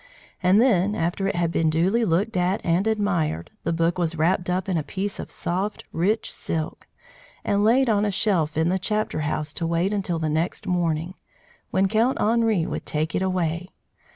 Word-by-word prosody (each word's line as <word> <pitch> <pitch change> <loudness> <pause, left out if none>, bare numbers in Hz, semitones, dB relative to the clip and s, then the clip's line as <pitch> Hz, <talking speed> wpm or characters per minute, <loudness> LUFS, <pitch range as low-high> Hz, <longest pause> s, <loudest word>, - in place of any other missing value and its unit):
And 185 +2 +4
then, 205 -5 +3
after 175 +3 -1
it 195 - -1
had 170 -1 0
been 165 -1 +2
duly 185 +9 +2
looked 205 +4 +1
at 180 +3 +1
and 175 +5 +2
admired, 190 - 0
the 170 - 0
book 165 +2 0
was 165 -1 0
wrapped 175 +3 +1
up 180 +1 -1
in 190 - 0
a 160 - +1
piece 195 +6 -4
of - - -6
soft, 190 +4 -3
rich 200 +7 0
silk 160 -1 -4 0.6
and 205 0 +2
laid 250 +5 +4
on 210 -2 +2
a 210 - +1
shelf 180 -7 +1
in 160 +1 +2
the 190 +1 +1
chapter 215 -1 -1
house 150 0 -2
to 165 - -2
wait 170 +4 0
until 190 -4 -1
the 160 -1 -1
next 160 +6 -1
morning, 175 -2 -1 0.6
when 190 +1 +2
Count 225 +6 +1
Henri 220 -5 +2
would - - -5
take 155 +2 -1
it - - 0
away. 180 -2 -1
180 Hz, 190 wpm, -24 LUFS, 165-205 Hz, 0.6 s, And